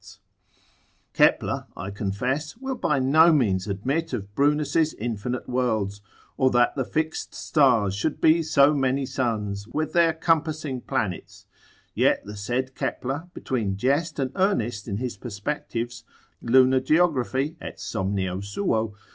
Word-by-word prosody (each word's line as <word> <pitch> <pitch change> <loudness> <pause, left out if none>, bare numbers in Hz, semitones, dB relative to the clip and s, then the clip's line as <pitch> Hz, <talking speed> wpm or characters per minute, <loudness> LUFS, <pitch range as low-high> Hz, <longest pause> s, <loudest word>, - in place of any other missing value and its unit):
disputes: - - -15 0.9
Kepler - - +2
(I 95 +2 -5
confess) 125 - -3
will 265 +1 -4
by 170 - 0
no 155 +6 +5
means 100 - +1
admit 135 +11 -2
of 100 -4 -5
Brunus's 150 +4 +2
infinite 120 +2 -4
worlds, 110 -5 -1 0.4
or 130 - +4
that 120 -1 +3
the 135 - 0
fixed 155 +5 -3
stars 120 -10 +3
should 110 +10 -2
be 160 +1 +5
so 150 -2 +4
many 135 -1 +1
suns, 105 -6 -2
with 155 +6 -3
their 170 -1 +4
compassing 155 -4 0
planets, 95 -7 -4 0.5
yet - - +2
the 105 +1 -8
said 125 +6 -2
Kepler 140 +9 -3
between 105 -7 -2
jest 145 +8 0
and 135 -3 -1
earnest 120 - 0
in 100 -2 -2
his 125 +1 -4
perspectives, 120 +1 -4 0.4
lunar 130 +2 +5
geography, 145 -1 +1
& - - -29
somnio 95 -2 -3
suo, 110 - 0
dissertat. 105 -1 -17
130 Hz, 140 wpm, -25 LUFS, 105-150 Hz, 0.9 s, no